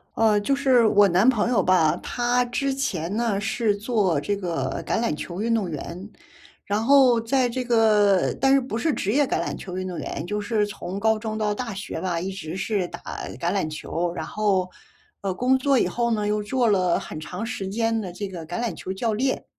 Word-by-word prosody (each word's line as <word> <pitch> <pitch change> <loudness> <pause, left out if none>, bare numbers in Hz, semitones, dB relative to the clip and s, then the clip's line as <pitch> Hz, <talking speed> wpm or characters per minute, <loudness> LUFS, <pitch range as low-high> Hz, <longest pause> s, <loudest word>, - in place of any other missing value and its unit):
呃， 220 -2 +3
就 275 +7 +1
是 260 -4 +4
我 205 -1 +5
男 190 +6 +4
朋 235 -2 +1
友 210 -7 +2
吧， 175 -4 +3
他 245 0 +1
之 270 +3 -1
前 195 - -2
呢 230 -4 0
是 215 0 0
做 205 - +1
这 200 +8 -1
个 170 -9 -3
橄 - - 0
榄 230 -10 0
球 175 +4 -6
运 230 +1 +1
动 210 -6 0
员， 170 +6 -7 0.6
然 205 +2 -1
后 255 -2 +5
在 250 +2 +1
这 250 +1 -3
个 215 -5 +3
但 270 0 +5
是， 275 - +6
不 250 -3 -4
是 300 +6 +1
职 200 - -1
业 290 +2 +4
橄 - - -1
榄 - - -3
球 185 -2 -7
运 185 0 -3
动 180 -2 -5
员， 145 - -5
就 210 +3 -2
是 210 0 0
从 195 -1 -6
高 220 +1 +2
中 215 0 -4
到 210 -1 0
大 230 +1 -4
学 195 +1 -6
吧， 175 -3 -1
一 190 +3 -3
直 180 -3 -6
是 195 -2 -1
打 - - -9 0.4
橄 170 - 0
榄 190 -6 0
球。 170 +3 -3
然 - - -4
后， 195 -4 0 0.5
呃， 195 -2 -1
工 250 +7 +2
作 270 0 +2
以 - - +2
后 235 -1 -1
呢， 210 -2 0
又 210 0 0
做 245 +3 +1
了 185 -4 +2
很 - - -8
长 180 +7 -5
时 215 -5 -4
间 225 +2 0
的 185 -4 -6
这 200 +3 -5
个 175 -4 -8
橄 175 +8 -4
榄 230 -8 -2
球 185 - -6
教 220 +4 -1
练， 260 +5 -1
210 Hz, 240 characters per minute, -24 LUFS, 185-235 Hz, 0.6 s, 是